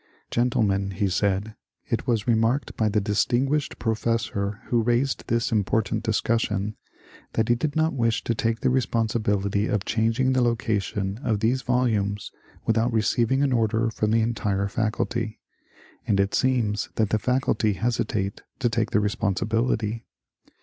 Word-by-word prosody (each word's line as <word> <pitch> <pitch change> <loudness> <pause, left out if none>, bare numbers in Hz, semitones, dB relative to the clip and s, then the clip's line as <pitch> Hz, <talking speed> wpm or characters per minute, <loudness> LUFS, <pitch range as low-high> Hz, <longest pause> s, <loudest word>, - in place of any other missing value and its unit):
*^ - - -39 0.3
Gen 120 +1 +2
tlemen," 100 -4 0
he 100 +1 0
said, 95 +1 +1
^^ 110 0 -11 0.3
it - - -2
was 115 -2 +1
remarked 115 +3 +1
by 110 -1 +1
the 105 +1 +2
distinguished 125 +8 0
pro 115 -2 0
fessor 110 -2 -2
who 120 -1 +1
raised 120 +4 +1
this 115 +1 0
important 110 0 +1
discussion 110 -2 0 0.6
that 110 0 0
he - - +6
did 145 +6 -2
not 160 +1 +2
wish 115 -3 0
to 115 - 0
take 115 +1 -1
the - - +2
responsibility 110 -5 0
of 105 -2 -1
changing 115 +4 +1
the 130 - +2
location 105 -3 -1
of 110 -6 0
these 120 +4 +1
volumes 110 -6 0 0.3
without 115 +2 +2
receiving 115 +4 +2
an 135 -2 +2
order 115 0 +1
from 110 -1 -1
the 115 +1 +3
entire 100 -3 0
Faculty, 110 +1 -2 0.7
and 100 -2 +2
it 100 0 +1
seems 115 -5 +1
that 110 -2 +1
the 110 - +2
Faculty 125 -2 +1
hesitate 105 -3 -1 0.2
to 125 -3 +1
take 115 -2 0
the 105 - +2
responsibility. 110 +2 0
110 Hz, 155 wpm, -25 LUFS, 105-120 Hz, 0.7 s, he